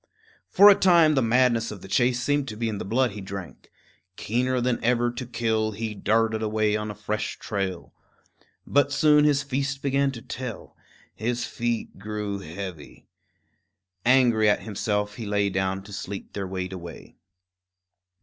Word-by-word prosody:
For 200 - +7
a 205 - +10
time 175 -5 +5
the 135 - +2
madness 120 -1 +2
of 105 -4 -8
the - - -9
chase 120 +4 +2
seemed 145 -1 +1
to 110 - -6
be 115 0 -1
in 105 -3 -3
the - - -4
blood 120 +4 +1
he 105 0 -8
drank. 95 -3 -8 0.5
Keener 125 +5 0
than 125 0 -1
ever 120 0 +2
to 120 0 -6
kill, 110 -2 -1
he 110 +1 -4
darted 110 +1 +1
away 110 -1 +1
on 105 0 -3
a 105 - -6
fresh 105 +1 -3
trail. 95 -4 -4 0.7
But 145 0 +2
soon 150 0 +4
his 140 -2 +3
feast 140 0 -3
began 140 0 +2
to 115 - -8
tell; 125 -3 -7 0.4
his 120 +2 -2
feet 120 -1 -3
grew 105 -1 -4
heavy. 85 -3 -8 1.0
Angry 120 -4 +4
at 105 - +1
himself, 105 -1 -2
he 115 - -5
lay 100 -1 +1
down 95 +1 -1
to 105 +1 -12
sleep 100 0 -7
their 100 -2 -4
weight 95 0 -4
away. 85 -2 -10
110 Hz, 165 wpm, -25 LUFS, 105-125 Hz, 1.0 s, a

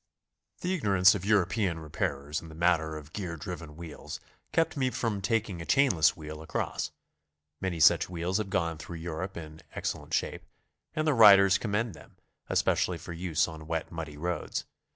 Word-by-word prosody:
The 180 +1 0
ignorance 100 - +5
of 100 -2 -4
European 100 -3 +2
repairers 75 -2 -3
in 80 - -11
the 80 - -11
matter 80 -2 +1
of 75 0 -11
gear 90 -5 -4
driven 80 -1 -7
wheels 85 -3 -8 0.3
kept 165 0 +1
me 130 -3 +1
from 110 -5 -2
taking 100 -3 -1
a - - -4
chainless 115 - +4
wheel 75 0 -8
across. 80 - -2 0.7
Many 95 -3 -2
such 80 - +5
wheels 90 +3 -1
have 105 -2 -3
gone 85 -4 -1
through 85 +1 -7
Europe 85 +3 -5
in 80 -1 -9
excellent - - -2
shape, - - -2 0.5
and 155 - 0
their 155 - +3
riders 100 -5 +8
commend 110 0 -1
them, 75 - -15 0.3
especially - - +2
for 85 - -8
use 85 -2 0
on 80 -1 -9
wet, 80 -1 -2
muddy 80 -3 -6
roads. 90 +3 -3
85 Hz, 170 wpm, -29 LUFS, 80-100 Hz, 0.7 s, riders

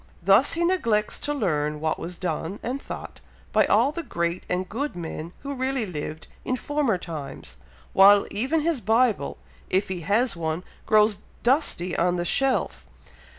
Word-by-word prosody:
Thus 200 +9 +5
he 335 - 0
neglects 230 -13 +1
to 295 - -2
learn 150 - -1
what 155 +1 -1
was 175 +1 -6
done, 175 +2 -3
and 260 +4 -3
thought, - - -8 0.3
by - - +4
all 235 +7 +4
the 335 - -4
great 170 - -3
and 180 +1 -1
good 280 +9 -3
men 165 -1 -6
who 280 0 -4
really 260 -2 -1
lived 155 -3 -6 0.2
in 255 - -1
former 280 -5 0
times, 145 - -8 0.4
while 200 +1 +7
even 265 +10 0
his 315 -5 0
Bible, 225 +2 +2 0.3
if 190 +2 +1
he 185 -2 -3
has 210 +8 +1
one, 160 +1 -3 0.2
grows 210 -1 +4 0.2
dusty 240 - +1
on 180 +1 +2
the 175 -1 -2
shelf. 270 +7 +1
205 Hz, 160 wpm, -25 LUFS, 170-260 Hz, 0.4 s, while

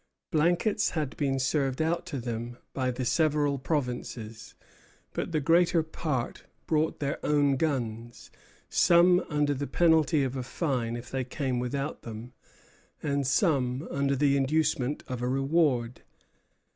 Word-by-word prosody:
Blankets 175 +7 +2
had 150 -5 -3
been 135 -2 0
served 135 0 0
out 165 +3 0
to 145 -6 -4
them 120 0 -5 0.2
by 130 -2 -1
the 125 0 -3
several 145 -1 +2
provinces, 125 -6 -4 0.6
but - - -3
the 155 - +1
greater 165 +2 +3
part 150 -5 -3 0.2
brought 155 0 0
their 140 -1 -3
own 145 -2 +3
guns; 120 -6 -3 0.4
some 175 +1 +5
under 150 -2 +1
the 140 +1 -3
penalty 160 -3 +3
of 130 0 -2
a 130 - -2
fine 125 -3 -2
if 120 +1 -8
they 135 -1 -1
came 130 -1 -2
without 135 +4 -3
them, 115 +2 -8 0.7
and 140 -2 0
some 130 -1 +1
under 140 0 +1
the 140 0 +3
inducement 140 -1 0
of 125 -2 -4
a 125 - -1
reward. 135 -3 +1
140 Hz, 140 wpm, -28 LUFS, 125-155 Hz, 0.7 s, some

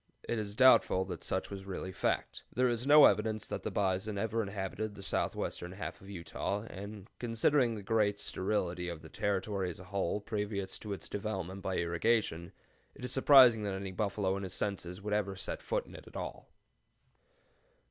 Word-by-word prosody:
It 120 - 0
is 105 -1 -4
doubtful 125 -7 +6
that 90 -3 -6
such 95 - -2
was 95 -1 -7
really 95 -1 -4
fact. - - -1
There 125 +2 +2
is 120 +2 -1
no 150 0 +9
evidence 110 -1 +2
that - - -4
the - - -3
bison 100 +1 0
ever 115 +2 0
inhabited 100 +1 -4
the 100 - -9
southwestern 90 -1 -2
half 95 - -6
of 95 - -12
Utah, 100 +2 -3
and, 100 +1 -8
considering 120 +1 +2
the 105 - -7
general 105 0 +3
sterility 90 -3 -1
of 85 -2 -7
the 80 - -10
Territory 100 0 -1
as 85 - -7
a - - -9
whole 100 0 -1
previous 105 -2 -3
to 105 -2 -5
its 100 - -6
development 95 -2 -4
by 95 -1 -2
irrigation, 85 0 +1 0.4
it 125 - -7
is 125 - -2
surprising 130 -4 +7
that 100 -2 -2
any 95 0 -4
buffalo 100 0 0
in - - -4
his 95 -2 -5
senses 95 -2 -3
would 105 0 -2
ever 100 -2 0
set 95 - -4
foot - - -1
in - - -14
it - - -11
at - - -9
all. - - -6
100 Hz, 190 wpm, -33 LUFS, 95-110 Hz, 0.4 s, no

